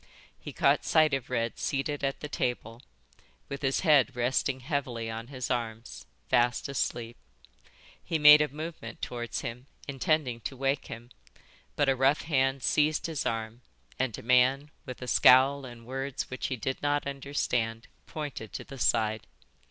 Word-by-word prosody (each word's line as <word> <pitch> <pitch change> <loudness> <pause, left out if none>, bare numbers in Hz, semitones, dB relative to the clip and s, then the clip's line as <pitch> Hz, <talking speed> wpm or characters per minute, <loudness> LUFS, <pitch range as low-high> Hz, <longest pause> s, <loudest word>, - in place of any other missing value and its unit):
He - - -8
caught - - +2
sight 155 -2 +3
of 135 -3 -2
Red 115 -2 -2
seated 140 +1 -2
at 135 0 -2
the 150 - -4
table, 120 -4 -3 0.7
with 140 -1 -6
his 135 -1 0
head 145 -6 +4
resting 130 +2 0
heavily 125 -5 -3
on 115 +1 -6
his 130 -2 -5
arms, 115 -2 -4 0.2
fast 120 +3 +2
asleep. 120 -4 -3 0.9
He 165 - -1
made 150 0 +9
a 150 - +2
movement 150 -5 -7
towards 120 -1 -4
him, 125 +3 -7 0.2
intending 135 -2 0
to 130 +4 -6
wake 135 +1 -1
him, 120 +2 -9 0.6
but 145 - +2
a 135 - +3
rough 135 +3 +3
hand 135 -3 +1
seized 150 0 +2
his 160 -4 -2
arm, 115 +1 -4 0.4
and 120 -5 -1
a - - -10
man, 130 +4 +3 0.2
with 130 0 -7
a - - -6
scowl 135 +3 +5
and 120 -2 -11
words 135 +2 -4
which 130 - -3
he 130 - -2
did 130 +3 -4
not 145 0 0
understand, 125 -5 -2 0.2
pointed 145 -8 -6
to - - -5
the 135 - -11
side. 110 -2 +1
130 Hz, 160 wpm, -29 LUFS, 120-140 Hz, 0.9 s, made